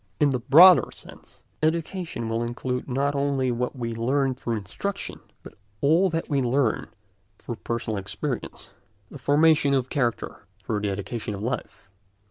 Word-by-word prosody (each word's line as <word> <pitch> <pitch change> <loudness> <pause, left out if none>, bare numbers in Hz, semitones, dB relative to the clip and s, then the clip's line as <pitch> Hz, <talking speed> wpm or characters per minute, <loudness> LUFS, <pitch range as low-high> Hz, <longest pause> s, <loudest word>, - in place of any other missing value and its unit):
In 145 -2 +4
the 130 - 0
broader 165 +9 +7
sense, - - -14 0.2
education 165 -4 -2
will 115 +1 -1
include 125 +2 -3
not 140 +3 0
only 140 -2 0
what 125 +2 -2
we 115 -2 -4
learn 130 +4 +1
through 120 -2 -3
instruction, 110 - -5 0.2
but - - -11 0.3
all 165 +7 +3
that 165 -1 -2
we 140 -3 +1
learn 125 -1 +1 0.5
through 120 - -7
personal 110 -2 -3
experience—the 100 +3 -7
formation 145 0 +4
of 130 -1 -1
character 120 -6 -2 0.2
through 105 +2 -2
the 105 0 -1
education 105 +2 -4
of 100 - -7
life. 120 -4 -5
130 Hz, 145 wpm, -25 LUFS, 115-145 Hz, 0.5 s, broader